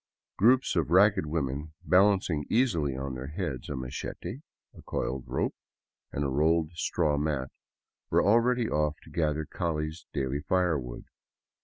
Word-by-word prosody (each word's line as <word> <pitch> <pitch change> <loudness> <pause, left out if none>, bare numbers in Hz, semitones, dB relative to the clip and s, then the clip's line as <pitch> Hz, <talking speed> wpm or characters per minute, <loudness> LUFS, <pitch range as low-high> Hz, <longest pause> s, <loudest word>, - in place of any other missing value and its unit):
Groups 125 +4 +4
of 80 -4 +1
ragged 95 -1 +5
women, 75 0 -2
balancing 95 -5 +3
easily 85 - +1
on 70 0 -4
their 65 +1 -6
heads 75 -5 -4
a 70 - -3
machete, 65 - -5 0.3
a - - -13
coiled 65 0 -3
rope, - - -1 0.6
and 70 - -2
a - - +1
rolled 80 +4 +2
straw 80 -3 0
mat, 70 -3 -1 0.6
were - - +3
already 120 +2 +3
off 75 0 0
to - - -15
gather 80 -2 0
Call's 80 0 -3
daily 70 -1 -1
firewood. 75 -7 -1
75 Hz, 140 wpm, -29 LUFS, 70-90 Hz, 0.6 s, ragged